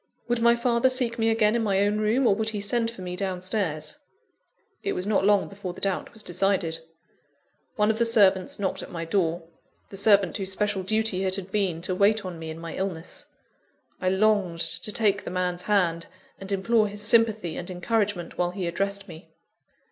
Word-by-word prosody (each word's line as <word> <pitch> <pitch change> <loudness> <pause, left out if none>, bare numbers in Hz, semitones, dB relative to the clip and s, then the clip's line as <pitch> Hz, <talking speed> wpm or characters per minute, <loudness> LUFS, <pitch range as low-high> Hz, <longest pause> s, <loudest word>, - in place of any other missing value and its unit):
Would 240 -1 0
my 235 0 +5
father 235 +1 +2
seek 250 -2 +1
me 225 0 +2
again 225 -1 +3
in 235 - +1
my 200 -3 +1
own 205 +1 +1
room, 220 +5 +2
or 215 - +5
would 220 +2 -1
he 215 -2 -4
send 230 +3 +1
for 230 -5 -10
me 180 0 -5
down 185 -1 -3
stairs? 185 - -2 0.8
It 400 - -2
was 180 - -3
not 205 -2 +1
long 205 -1 +3
before 195 -3 -7
the - - -11
doubt 195 -2 -2
was 220 -2 -7
decided. 180 -3 0 1.0
One 210 0 +3
of 220 - -4
the 235 - +3
servants 195 -5 +3
knocked 195 -2 -2
at - - -8
my 165 -1 -5
door 170 -1 0 0.5
the 195 - -7
servant 200 -3 +4
whose 195 -1 -3
special 205 0 -1
duty 215 -1 0
it 190 0 +2
had 195 -1 -6
been 185 -5 -1
to 185 - -1
wait 205 +2 +2
on 175 -3 -6
me 160 0 -6
in 160 - -6
my 165 0 -7
illness. 180 -4 -5 0.7
I 185 - +1
longed 190 -3 +1
to 210 - 0
take 205 -2 +1
the - - -5
man's 180 0 -2
hand, 180 -5 +1 0.3
and 195 +1 -8
implore 215 +3 +2
his 205 0 -6
sympathy 220 -5 +2
and 175 - -6
encouragement 190 -1 -2
while 175 0 +2
he 185 0 -4
addressed 200 +3 -2
me. 165 -1 -12
200 Hz, 200 wpm, -26 LUFS, 180-215 Hz, 1.0 s, my